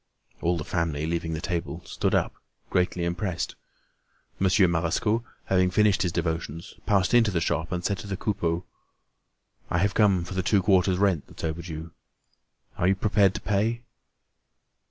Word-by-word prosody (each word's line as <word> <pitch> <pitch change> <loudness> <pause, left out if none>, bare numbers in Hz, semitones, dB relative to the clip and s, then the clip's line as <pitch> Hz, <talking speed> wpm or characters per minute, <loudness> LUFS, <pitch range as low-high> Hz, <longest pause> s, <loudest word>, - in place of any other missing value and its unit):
All 85 +1 +1
the 75 - -3
family, 80 -2 -1
leaving 80 0 -2
the 80 - -3
table, 85 -3 -3
stood - - 0
up, - - +1 0.4
greatly 90 -1 +1
impressed. 90 0 -2 0.9
Monsieur 95 0 +4
Marescot, 85 +7 +1 0.2
having 90 -1 +3
finished 105 +1 +3
his 90 - +1
devotions, 85 0 -3
passed 100 0 +2
into 115 -3 +5
the 90 -4 0
shop 80 -1 -1
and 90 -1 -3
said 100 -2 0
to - - -8
the 95 -1 -3
Coupeaus: 85 -5 -1 1.1
"I - - +1
have 95 +3 +2
come 100 -5 +3
for 85 - -7
the 95 - 0
two 95 +1 +2
quarters' 95 -2 +3
rent 95 -6 +1
that's - - -12
overdue. 80 0 -4 0.9
Are 90 - +2
you 95 - +4
prepared 100 0 +3
to - - -4
pay?" 110 +4 0
90 Hz, 160 wpm, -26 LUFS, 85-100 Hz, 1.1 s, into